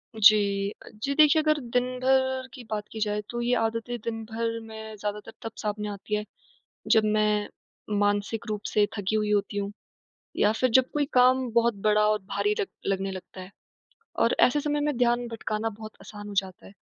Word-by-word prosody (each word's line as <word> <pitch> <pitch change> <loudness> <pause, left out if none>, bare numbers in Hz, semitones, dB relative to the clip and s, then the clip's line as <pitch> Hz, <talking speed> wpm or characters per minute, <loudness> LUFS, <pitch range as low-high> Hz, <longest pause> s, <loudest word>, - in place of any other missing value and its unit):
जी। 205 -2 +4 0.3
जी 280 - 0
देखिए, 310 0 +6
अगर 305 -1 +2
दिन 245 0 0
भर 260 0 +2
की 255 - -9
बात 210 -1 -2
की 220 - -6
जाए, 210 0 -1
तो 240 0 -3
ये 245 +1 +1
आदतें 230 +2 -2
दिन 225 -1 -3
भर 230 +1 -3
में 220 0 -8
ज़्यादातर 210 0 -5
तब 225 - -5
सामने 210 -1 -2
आती 205 +1 -4
हैं, 210 0 -2 0.7
जब 220 - +5
मैं 210 -1 +1 0.5
मानसिक 205 +2 0
रूप 210 -1 -3
से 210 -1 +4
थकी 205 +2 -1
हुई 210 -1 +1
होती 205 0 0
हूँ, 200 0 -2 0.7
या 210 - +4
फिर 250 +3 +1
जब 260 - +4
कोई 295 -1 +1
काम 255 0 +4
बहुत 235 0 +3
बड़ा 210 0 +4
और 215 0 +2 0.2
भारी 205 +1 +1
लग - - 0 0.2
लगने 195 0 0
लगता 185 0 -9
है, 185 +1 -9 0.7
और 230 - +3
ऐसे 290 +4 +4
समय 295 0 -1
में 295 -2 0
ध्यान 240 0 +2
भटकाना 225 -1 -3
बहुत 215 0 -9
आसान 205 -1 -9
हो 205 - -7
जाता 190 -1 -13
है। - - -13
220 Hz, 190 wpm, -27 LUFS, 205-245 Hz, 0.7 s, देखिए